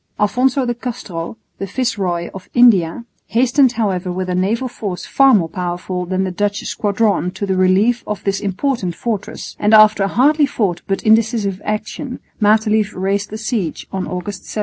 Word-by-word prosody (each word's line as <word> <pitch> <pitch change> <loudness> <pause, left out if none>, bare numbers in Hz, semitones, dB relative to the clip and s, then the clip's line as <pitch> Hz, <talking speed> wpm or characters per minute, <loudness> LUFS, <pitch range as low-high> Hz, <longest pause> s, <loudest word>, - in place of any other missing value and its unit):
Alphonso 255 +5 +2
de 240 - 0
Castro, 225 -7 -6 0.2
the 195 - -3
Viceroy 195 -7 -2
of 190 -1 -10
India, 230 -5 +4 0.2
hastened 255 +2 +3
however 190 -5 -1
with 185 0 -3
a - - 0
naval 210 +8 0
force 205 -7 -5
far 270 -1 +4
more 175 -5 +2
powerful 180 +1 -4
than 185 +1 0
the 190 - -2
Dutch 205 +3 -1
squadron 205 -3 0
to 190 +2 -4
the 190 -1 0
relief 195 +6 +3
of 210 -3 -4
this 195 -1 0
important 200 -2 -2
fortress; 220 -1 -4
and 210 +1 +4
after 215 -1 +6
a 195 - +2
hardly 290 +8 +3
fought 195 -9 -1
but 195 - -2
indecisive 215 -3 +2
action 220 +5 -4 0.2
Matelief 215 0 +2
raised 195 +2 -1
the 215 - -6
siege 215 - -3
on 190 -1 -3
August 180 +2 -5
17. - - -5
205 Hz, 170 wpm, -18 LUFS, 185-230 Hz, 0.2 s, after